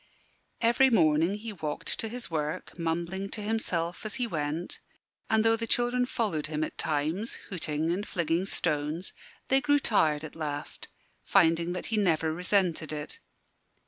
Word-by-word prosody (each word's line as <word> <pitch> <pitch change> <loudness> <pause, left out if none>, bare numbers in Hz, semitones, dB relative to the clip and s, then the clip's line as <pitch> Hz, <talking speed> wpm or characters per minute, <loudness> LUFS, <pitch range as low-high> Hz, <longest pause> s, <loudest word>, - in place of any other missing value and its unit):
Every 240 +3 +5
morning 165 -3 +4
he 215 +1 -6
walked 155 -5 -3
to 225 - -1
his 240 -5 -5
work, 155 -1 -3
mumbling 170 +3 -2
to 215 - -4
himself 180 -6 -1
as 215 - -4
he 250 - 0
went; 160 -3 -3 0.5
and 220 0 +3
though 225 0 +5
the 230 0 -3
children 245 +1 +2
followed 195 - -1
him 155 0 -1
at - - -4
times, 160 - -1 0.2
hooting 160 -2 -1
and 200 +4 -2
flinging 170 0 0
stones, 155 +1 -1 0.4
they 270 +1 +4
grew 290 0 +4
tired 160 - +2
at 155 - -8
last, 150 -2 -5 0.4
finding 170 -2 +3
that 180 - -4
he - - +2
never 160 -5 +2
resented 180 -2 +1
it. 150 0 -5
175 Hz, 155 wpm, -29 LUFS, 155-220 Hz, 0.5 s, Every